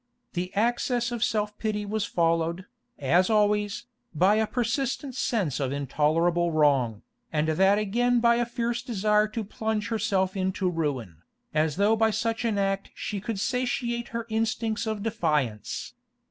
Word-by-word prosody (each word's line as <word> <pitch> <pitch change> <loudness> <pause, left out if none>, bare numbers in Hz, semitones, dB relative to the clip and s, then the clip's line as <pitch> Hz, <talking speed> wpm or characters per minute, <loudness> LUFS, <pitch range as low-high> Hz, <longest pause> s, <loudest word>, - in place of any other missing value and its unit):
The 180 +1 -3
access 240 +2 +1
of 240 -2 -1
self 210 -2 0
pity 210 -2 -2
was 215 0 -1
followed, 170 +1 0 0.3
as 170 +8 +3
always, 210 +1 +1 0.3
by 190 +7 +4
a 220 0 +2
persistent 255 +3 -1
sense 205 - -1
of 135 -2 -1
intolerable 155 +5 +1
wrong, 135 -8 +2 0.3
and 155 0 +1
that 190 +5 +4
again 240 +4 +2
by 235 0 +4
a 240 - +1
fierce 235 0 -2
desire 210 -3 +2
to 220 +1 -4
plunge 215 0 -2
herself 195 -4 0
into 190 0 -1
ruin, 135 - -3 0.4
as 155 -1 +1
though 205 +3 +3
by 225 0 +3
such 225 +2 -1
act 195 -3 0
she 205 -2 -4
could 220 -1 -3
satiate 240 0 -1
her 230 0 -4
instincts 220 0 -1
of 215 -2 -2
defiance. 150 - -1
210 Hz, 145 wpm, -27 LUFS, 170-230 Hz, 0.4 s, by